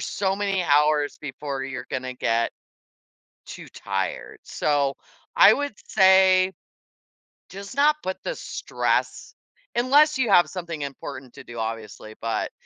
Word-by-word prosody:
so 195 -1 -1
many 200 -2 -1
hours 150 -1 +2
before 140 -1 -5
you're 130 -2 -6
gonna 130 0 -4
get 115 -2 0 0.9
too - - -10
tired. 95 -1 -4
So, 140 -2 0 0.4
I - - +8
would 285 -2 -3
say, 190 0 +5 1.0
just 200 +4 -9
not 300 +2 +3
put 185 0 -4
the - - -3
stress - - -2 0.4
unless 285 +5 +4
you 250 -4 0
have 175 -2 +6
something 170 -4 -6
important 135 -2 -7
to - - -11
do, 120 -1 -9
obviously, 110 -1 -6
but 115 0 -2
150 Hz, 130 wpm, -24 LUFS, 130-195 Hz, 1.0 s, I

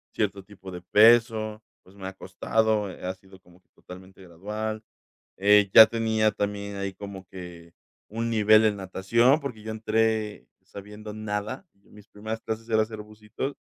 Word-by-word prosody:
cierto 100 -2 -2
tipo 95 -1 -12
de 90 -1 -8
peso, 110 +1 +4 0.2
pues, 95 - -20
me 95 -1 -8
ha 95 - -7
costado, 110 +1 -1
eh, 90 - -10
ha 90 - -2
sido 95 0 -19
como 90 0 -23
que - - -48
totalmente 95 +1 -14
gradual. 105 +5 -5 0.6
Eh, 100 0 +4
ya 110 - +11
tenía 110 -1 +1
también 100 0 -4
ahí 100 0 -4
como 100 -1 -9
que 90 -2 -11 0.4
un 115 +2 -3
nivel 110 0 +5
en 105 -1 +2
natación, 115 +9 +2
porque 125 -7 -7
yo 110 0 -5
entré 110 -1 -1 0.2
sabiendo 105 +1 -10
nada, 105 - -5
y 100 - -29
mis 105 0 -16
primeras 110 +2 -6
clases 115 +1 -5
era 110 -1 +3
hacer 110 -1 -6
bucitos, 105 +6 -7
105 Hz, 165 wpm, -26 LUFS, 95-110 Hz, 0.6 s, ya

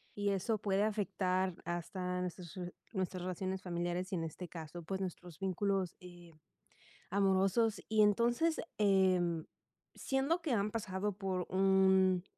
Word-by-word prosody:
y 205 0 0
eso 200 +3 0
puede 200 0 +1
afectar 190 -3 0
hasta 180 +1 -3
nuestras 180 -2 -5
re 180 -1 -5 0.2
nuestras 185 -1 -2
relaciones 185 +1 -3
familiares 175 +1 -2
y - - +2
en 165 - -1
este 165 +3 -6
caso, 165 0 -8
pues, 190 +4 -3
nuestros 180 -3 -6
vínculos, 195 -1 0
eh, 175 -2 -13 0.8
amorosos. 195 +3 +2
Y 215 0 +4
entonces, 235 +10 +3 0.2
em, 185 -5 +3 0.5
siendo 275 +6 0
que 320 -4 -2
han 205 -2 +1
pasado 205 -2 -2
por 190 -3 -1
un 190 -1 +4
190 Hz, 135 wpm, -35 LUFS, 180-200 Hz, 0.8 s, Y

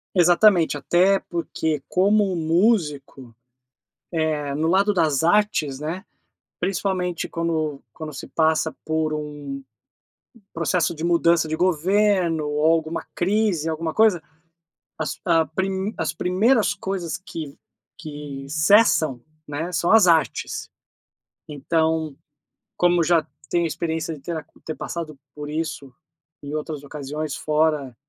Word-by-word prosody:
Exatamente, 175 -2 +5
até 185 +6 +3
porque 160 -3 -3
como 195 0 +2
músico, 155 - 0 0.8
eh, 155 -3 -1
no 160 +2 0
lado 200 +4 +3
das 160 -5 +1
artes, 170 -7 +2
né, 170 +6 -5 0.5
principalmente 180 -2 -1
quando 160 -4 -2
quando 155 -2 -7
se 135 - -8
passa 160 0 +1
por 160 0 0
um 145 -2 -5 0.9
processo 170 +1 0
de 160 - -7
mudança 170 -1 +3
de 155 - -2
governo 180 -2 +2
ou 150 +1 -1
alguma 165 0 -1
crise, 190 -4 +1
alguma 160 0 -3
coisa, 215 -7 +4 0.8
as 155 - -3
ah, 165 -2 +3
prim 190 +4 -2
as - - -1
primeiras 205 +6 +2
coisas 190 -4 -3
que 165 -6 -8 0.4
que 145 -3 -8
cessam, 155 - +4 0.3
né, 160 +5 -4
são 170 +1 0
as 220 -4 +7
artes. 165 -2 +1 0.8
Então, 160 0 -1 0.6
como 175 -1 +3
já 165 -2 +3 0.2
tenho 170 -1 +1
experiência 160 0 -3
de 140 - -15
ter 165 +3 -4
a 150 - -7 0.2
ter 155 - -4
passado 155 -4 -6 0.2
por 150 0 -6
isso 150 -4 -4 0.5
em 145 - -6
outras 150 -1 -5
ocasiões, 150 +1 -5
fora, 150 -3 +1
eh, 120 - -23
160 Hz, 125 wpm, -23 LUFS, 150-180 Hz, 0.9 s, as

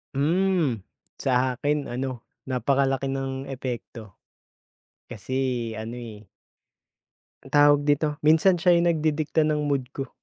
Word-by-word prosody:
Hmm, 165 - +1 0.4
sa 130 -1 +1
akin 145 -2 -1
ano, 125 -1 -4 0.2
napakalaki 135 +1 0
ng 135 0 -3
epekto. 120 -5 -7 0.9
Kasi 120 +3 -6 0.4
ano, 115 +2 -6
eh 110 -3 -10 1.2
anong - - -15
tawag 145 0 +6
dito, 145 +1 +2 0.2
minsan 160 +4 +5
siya 175 +1 +4
yung 170 0 +3
nagdidikta 155 -1 +1
ng 150 -1 0
mood 135 -3 0
ko. 135 - -5
135 Hz, 115 wpm, -25 LUFS, 125-155 Hz, 1.2 s, tawag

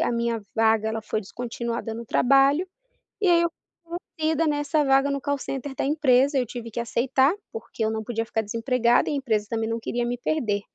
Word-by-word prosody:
a - - +1
minha 235 -1 -1 0.2
vaga 220 -1 +3
ela 220 0 -3
foi 215 - -2
descontinuada 235 +2 -4
no 230 +1 -7
trabalho, 275 - +4 0.5
e 410 - +1
aí, 340 -1 +5
eu 340 - +2 0.3
fui 340 +1 -5 0.2
envolvida 320 +1 +1
nessa 295 0 +1
vaga 270 +1 +4
no 280 0 -1
call 285 0 -1
center 270 +1 -5
da - - -2
empresa, 280 -1 +3
eu 255 - +2
tive 235 0 -7
que 230 - -5
aceitar, 260 +5 +2 0.2
porque 225 0 -5
eu 220 - +2
não 220 0 -3
podia 225 0 -2
ficar 225 0 -1
desempregada 235 +2 +2
e - - -1
a - - 0
empresa 220 -7 0
também 225 -1 -1
não 230 0 -2
queria 240 +1 -2
me 245 +1 -2
perder. 235 -7 -1
245 Hz, 210 wpm, -25 LUFS, 225-280 Hz, 0.5 s, aí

